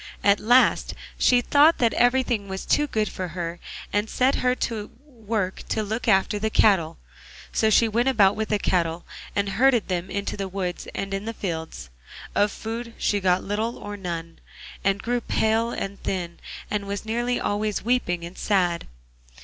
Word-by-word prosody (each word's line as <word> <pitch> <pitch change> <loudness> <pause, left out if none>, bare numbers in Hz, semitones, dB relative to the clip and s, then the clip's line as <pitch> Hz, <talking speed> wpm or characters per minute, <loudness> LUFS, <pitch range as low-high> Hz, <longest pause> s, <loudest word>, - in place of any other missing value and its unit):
At 200 0 +4
last 245 +4 +3 0.2
she 245 -1 +5
thought 295 +6 +5
that 235 -2 +2
everything 245 -4 +2
was 190 0 -5
too 295 0 +2
good 215 -5 0
for 185 -1 -4
her, 170 0 -4 0.3
and 205 +1 0
set 260 +2 +2
her 250 0 +2
to 220 -4 -3 0.2
work 220 -8 -3
to 220 - 0
look 220 +4 -3
after 205 0 +3
the 220 +1 0
cattle. 170 -7 +3 0.6
So 220 - +3
she 225 +2 +5
went 235 +4 +1
about 205 -6 +4
with 220 0 -3
the 210 - +2
cattle, 170 -3 0 0.3
and 200 0 +1
herded 240 +2 +3
them 180 0 -2
in 200 0 -3
the 195 -1 -3
woods 185 -2 -4
and 195 0 -3
in 195 +1 -3
the 225 0 -4
fields. 160 - -5 0.4
Of 205 0 +2
food 230 +2 -6
she 205 - +1
got 185 -1 +2
little 215 +4 -2
or 205 0 -7
none, 170 -4 -6 0.4
and 195 0 +1
grew 245 +1 0
pale 225 +1 +1
and 200 -3 -5
thin, 175 -3 -3 0.3
and 205 -1 -2
was 200 +1 -4
nearly 240 +2 -1
always 210 0 -1
weeping 200 -8 0
and 175 +2 -9
sad. 180 -4 0
205 Hz, 175 wpm, -24 LUFS, 190-230 Hz, 0.6 s, she